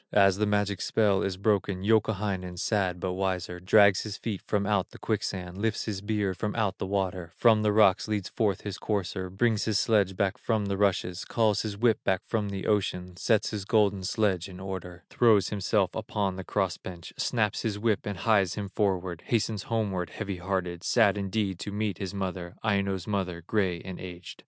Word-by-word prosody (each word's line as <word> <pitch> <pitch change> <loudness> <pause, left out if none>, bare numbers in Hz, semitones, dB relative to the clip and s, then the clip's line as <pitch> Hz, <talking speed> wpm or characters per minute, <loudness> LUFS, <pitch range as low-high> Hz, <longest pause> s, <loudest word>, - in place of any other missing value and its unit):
As 100 -2 +5
the 105 0 +1
magic 105 -2 0
spell 105 -3 +2
is 95 -2 -2
broken, 100 -2 0
Youkahainen, 100 -4 0
sad, 95 -2 0
but 90 +1 -2
wiser, 90 -2 -2
Drags 100 +1 +5
his 105 -1 -5
feet 105 -5 -4
from 100 -1 +1
out 100 -2 +1
the - - -13
quicksand, 95 -4 -3
Lifts 110 0 -1
his 100 -4 -3
beard 105 -3 -1
from 105 +2 -2
out 105 -5 0
the - - -3
water, 95 -3 -2
From 110 -3 +5
the 105 -1 +2
rocks 105 -2 +4
leads 105 -3 -1
forth 105 -5 0
his 100 -2 -6
courser, 95 -3 -2
Brings 110 +3 +1
his 110 -2 +1
sledge 100 -4 +2
back 95 -1 0
from 110 -3 0
the 100 0 -1
rushes, 95 -2 0
Calls 110 -3 +1
his 105 -2 -4
whip 115 0 +2
back 95 -1 +1
from 105 -3 -1
the 100 -1 -4
ocean, 90 -3 0
Sets 110 +3 +1
his 105 -3 -3
golden 100 -2 +2
sledge 95 -2 0
in 90 -1 -10
order, 90 -2 -6
Throws 110 -6 +4
himself 100 -1 +1
upon 105 -4 -2
the 95 - -6
cross 95 -2 -1
bench, 90 -2 -9
Snaps 110 -4 0
his 105 -3 -2
whip 105 -1 +1
and 100 -2 -3
hies 100 -4 +2
him 100 -2 -5
homeward, 95 -4 0
Hastens 110 -3 0
homeward, 100 -7 -1
heavy 100 -4 -5
hearted, 90 -2 -3
Sad 110 -5 +4
indeed 100 -2 -2
to 100 - -5
meet 105 -2 -2
his 100 0 -4
mother, 95 -2 -4
Aino's 100 -4 0
mother, 95 -5 -2
gray 95 -4 0
and 95 -1 -8
aged. 90 -1 -9
100 Hz, 195 wpm, -28 LUFS, 95-105 Hz, -, As